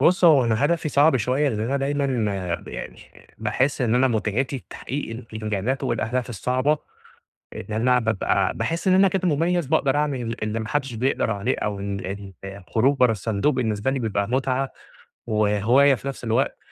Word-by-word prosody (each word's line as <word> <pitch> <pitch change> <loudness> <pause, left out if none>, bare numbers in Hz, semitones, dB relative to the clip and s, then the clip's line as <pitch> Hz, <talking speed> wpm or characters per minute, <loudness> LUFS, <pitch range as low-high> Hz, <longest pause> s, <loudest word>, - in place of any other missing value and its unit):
بُص 180 +1 +4
هو 145 -7 +7
أنا 115 +4 +1
هدفي 165 0 +1
صعب 145 0 +4
شوية 130 +5 +1
لأن 110 -4 -2
أنا 130 +5 0
دايمًا 135 -6 0 0.2
آآ - - +1
ب - - -14
يعني - - -7 0.4
باحس 135 +2 0
إن 120 -1 +2
أنا 130 +1 +4
متعتي 120 +4 -1
تحقيق 125 -4 -5
الإنجازات 110 +4 -2
والأهداف 120 +2 -1
الصعبة. 130 - 0 0.7
إن 105 - -6
أنا 125 +3 +3
بابقى 110 -4 0
باحس 170 +3 -1
إن 185 - +5
أنا 195 +1 +6
كنت 185 0 -2
مُميز 170 0 +1
باقدر 145 -2 +2
أعمل 130 -6 -1
اللي 110 +1 -2
ما 110 - -5
حدش 135 -4 -2
بيقدر 125 0 0
عليه 100 -2 -1
أو 100 -1 -3
ال 100 0 -5
الخروج 100 +8 0
برا 125 -3 +5
الصندوق 110 +6 0
بالنسبة 110 -1 0
لي 135 - -1
بيبقى 100 -4 -1
متعة 130 +1 0 0.6
وهواية 110 +6 +3
في 140 - -8
نفس 135 - -5
الوقت، 115 +3 0
125 Hz, 170 wpm, -23 LUFS, 110-140 Hz, 0.7 s, هو